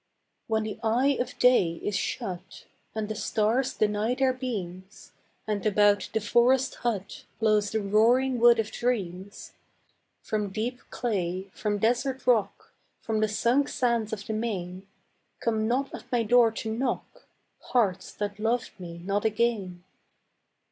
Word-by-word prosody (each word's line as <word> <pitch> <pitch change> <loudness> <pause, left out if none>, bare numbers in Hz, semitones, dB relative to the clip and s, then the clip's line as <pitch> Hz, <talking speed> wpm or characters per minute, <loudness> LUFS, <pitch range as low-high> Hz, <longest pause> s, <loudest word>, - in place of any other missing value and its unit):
When 220 -1 +1
the 215 -1 -5
eye 250 +5 +2
of 245 - -3
day 245 -9 +4
is 205 - -1
shut, 190 -4 -4 0.3
And 215 -1 -2
the 215 - -3
stars 220 +4 0
deny 215 +3 +1
their 265 0 +2
beams, 195 -6 -6 0.3
And 210 -3 -2
about 205 -1 +3
the 220 - 0
forest 245 +5 +3
hut 210 -5 -3
Blows 215 -2 +2
the 220 -1 -1
roaring 240 +5 +3
wood 235 0 +7
of 225 -1 -1
dreams, 200 -5 -3 0.7
From 210 -2 -2
deep 230 +5 -3
clay, 190 -4 -2
from 210 -1 -1
desert 245 +5 0
rock, 235 -5 +1 0.3
From 220 -1 -1
the 215 - +2
sunk 235 +6 +1
sands 235 -4 0
of 200 -2 -5
the 220 - -3
main, 195 -4 -4 0.5
Come 220 -1 0
not 265 +4 0
at 250 - -10
my 240 -2 +2
door 235 +1 +5
to 220 0 -4
knock, 260 - -3 0.3
Hearts 195 -7 0
that 205 0 -4
loved 230 +2 0
me 170 -1 -8
not 200 +1 0
again. 215 -5 0
220 Hz, 145 wpm, -27 LUFS, 205-240 Hz, 0.7 s, wood